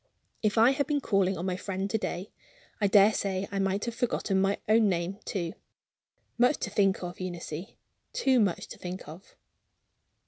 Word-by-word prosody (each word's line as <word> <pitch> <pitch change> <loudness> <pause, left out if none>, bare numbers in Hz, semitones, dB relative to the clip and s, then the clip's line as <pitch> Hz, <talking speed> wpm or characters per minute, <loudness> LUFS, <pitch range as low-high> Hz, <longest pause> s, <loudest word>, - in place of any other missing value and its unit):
If 215 0 +1
I 230 +4 +7
had 280 +1 0
been 295 -1 +1
calling 195 -6 +1
on 175 +3 -3
a 185 - 0
friend 190 0 -3
to 220 - +2
day, 185 -1 -4 0.5
I 205 - +3
daresay 195 -1 +3
I 200 - -2
might 195 +1 0
have 235 - -3
forgotten 220 -5 0
my 195 +1 +2
name, 200 -4 +2
too. 170 -5 -3 0.9
Much 245 +5 +4
to - - -2
think 195 -2 +2
of, 175 0 -6
Eunice 175 -1 -5 0.4
too 265 - +3
much 200 -6 +1
to - - -10
think 180 +1 -6
of." 165 +5 -12
195 Hz, 170 wpm, -29 LUFS, 185-220 Hz, 0.9 s, I